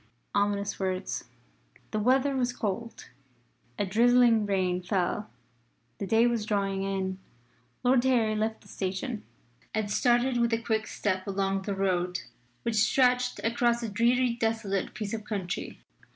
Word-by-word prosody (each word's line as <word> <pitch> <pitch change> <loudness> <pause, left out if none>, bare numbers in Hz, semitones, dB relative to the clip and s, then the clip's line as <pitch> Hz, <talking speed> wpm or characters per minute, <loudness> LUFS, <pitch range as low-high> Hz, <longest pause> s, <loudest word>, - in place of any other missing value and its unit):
Ominous 200 0 0
words. 185 0 -2 0.7
The 215 - 0
weather 265 +5 +3
was 245 -1 0
cold; 230 - -4 0.7
a 205 - 0
drizzling 230 +1 +4
rain 185 -2 +1
fell; 185 +3 -1 0.7
the 200 - -3
day 225 +4 +4
was 235 -3 +1
drawing 200 -2 0
in. 190 -1 -2 0.6
Lord 250 0 +4
Harry 230 -4 +3
left 220 +1 -1
the - - -19
station, 205 +5 -3 0.5
and 215 -2 -1
started 245 +3 +3
with 230 -1 +1
quick 220 -1 0
step 185 -2 -2
along 195 0 0
the 200 +1 -3
road, 180 -2 0 0.4
which 230 -2 -1
stretched 250 +3 +3
across 235 +1 +1
a 230 - -2
dreary 240 +4 +2
desolate 225 -5 -1
piece 210 -1 -4
of 220 -1 -3
country. 195 -5 -4
215 Hz, 135 wpm, -28 LUFS, 195-235 Hz, 0.7 s, drizzling